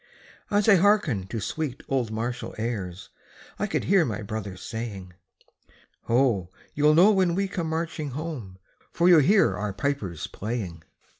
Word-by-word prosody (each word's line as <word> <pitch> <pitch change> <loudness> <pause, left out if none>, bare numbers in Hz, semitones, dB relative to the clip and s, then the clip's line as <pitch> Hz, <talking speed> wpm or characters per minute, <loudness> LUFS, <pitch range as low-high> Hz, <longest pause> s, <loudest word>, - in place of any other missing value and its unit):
As 205 +1 +2
I 200 -3 +7
hearkened 170 - +2
to 115 - -3
sweet 140 +5 -4
old 130 -4 0
martial 120 +3 -4
airs 100 -6 -4 0.5
I - - 0
could - - -1
hear 195 -1 +4
my 110 -7 -3
brother 105 -3 -5
saying: 100 -4 -6 0.9
"Ho! 115 -7 +2 0.2
you'll 150 +1 +4
know 185 +6 +7
when 185 -4 +2
we 195 +1 0
come 175 -4 -3
marching 160 -2 -3
home, 130 - -6 0.3
For 170 - +2
you'll 175 -3 +8
hear 195 +8 +4
our 105 -1 -3
pipers 105 - -3
playing." 100 -7 -5
125 Hz, 150 wpm, -26 LUFS, 105-165 Hz, 0.9 s, you'll